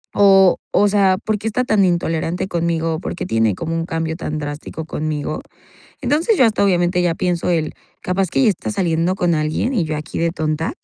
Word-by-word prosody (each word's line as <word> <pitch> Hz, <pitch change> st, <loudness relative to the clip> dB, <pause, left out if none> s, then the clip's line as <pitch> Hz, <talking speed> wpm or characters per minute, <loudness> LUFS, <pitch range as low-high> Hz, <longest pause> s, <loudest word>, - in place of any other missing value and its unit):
o 195 Hz, -2 st, +6 dB
o 205 Hz, -, +4 dB
sea, 195 Hz, -2 st, +3 dB
"¿Por 215 Hz, -1 st, 0 dB
qué 220 Hz, -, -4 dB
está 235 Hz, +3 st, 0 dB
tan 215 Hz, -4 st, +3 dB
intolerante 170 Hz, 0 st, -1 dB
conmigo 165 Hz, -2 st, -1 dB
o 160 Hz, -, -5 dB
por -, -, -4 dB
qué -, -, -4 dB
tiene 110 Hz, -3 st, +1 dB
como 165 Hz, -, -4 dB
un 165 Hz, 0 st, -1 dB
cambio 165 Hz, -1 st, -3 dB
tan 155 Hz, -3 st, -4 dB
drástico 145 Hz, +2 st, -6 dB
conmigo?", 155 Hz, -1 st, -3 dB, 0.6 s
entonces, 335 Hz, +9 st, +2 dB
yo 260 Hz, -, +6 dB
hasta, 215 Hz, -2 st, +1 dB
obviamente, 180 Hz, -2 st, +2 dB
ya 175 Hz, -2 st, +1 dB
pienso 175 Hz, 0 st, -1 dB
el: 160 Hz, -3 st, 0 dB, 0.3 s
"Capaz 185 Hz, +1 st, 0 dB
que -, -, +1 dB
ya 225 Hz, -, +5 dB
está 200 Hz, -, -4 dB
saliendo 175 Hz, -2 st, 0 dB
con 175 Hz, -3 st, +1 dB
alguien 155 Hz, -, -1 dB
y 185 Hz, -, +1 dB
yo 155 Hz, -1 st, -3 dB
aquí 150 Hz, 0 st, -6 dB
de 170 Hz, 0 st, +1 dB
tonta", 155 Hz, -1 st, -2 dB
170 Hz, 210 wpm, -19 LUFS, 160-195 Hz, 0.6 s, o